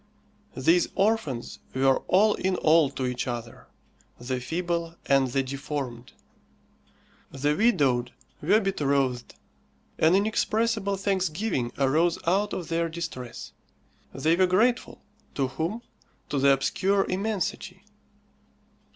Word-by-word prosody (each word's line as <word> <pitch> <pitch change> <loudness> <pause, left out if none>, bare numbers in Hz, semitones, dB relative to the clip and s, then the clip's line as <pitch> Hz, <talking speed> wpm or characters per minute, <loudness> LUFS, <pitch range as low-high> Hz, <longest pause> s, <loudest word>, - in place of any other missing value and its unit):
These 165 +7 +3
orphans 195 - -1 0.2
were 135 0 +3
all 210 +3 +4
in 190 0 -1
all 160 -3 +4
to 130 - -4
each 125 0 -3
other, 120 -1 -6 0.5
the 125 +1 -3
feeble 170 +5 -3
and 135 -1 +3
the 135 +2 0
deformed. 135 -3 -5 1.2
The 145 +2 0
widowed 135 - +2 0.3
were 215 - +4
betrothed. 140 - -1 0.6
An 160 +3 +5
inexpressible 215 0 0
thanksgiving 190 - -1
arose 155 +5 +2
out 200 +5 +1
of 175 -2 -5
their 165 0 0
distress. 160 -8 -7 0.6
They 160 +2 +1
were 185 +1 +3
grateful. 230 +7 +1 0.3
To 135 -2 0
whom? 170 - -3 0.5
To 140 - -1
the 140 +1 +5
obscure 190 +9 +1
immensity. 195 -1 -3
165 Hz, 110 wpm, -26 LUFS, 135-195 Hz, 1.2 s, An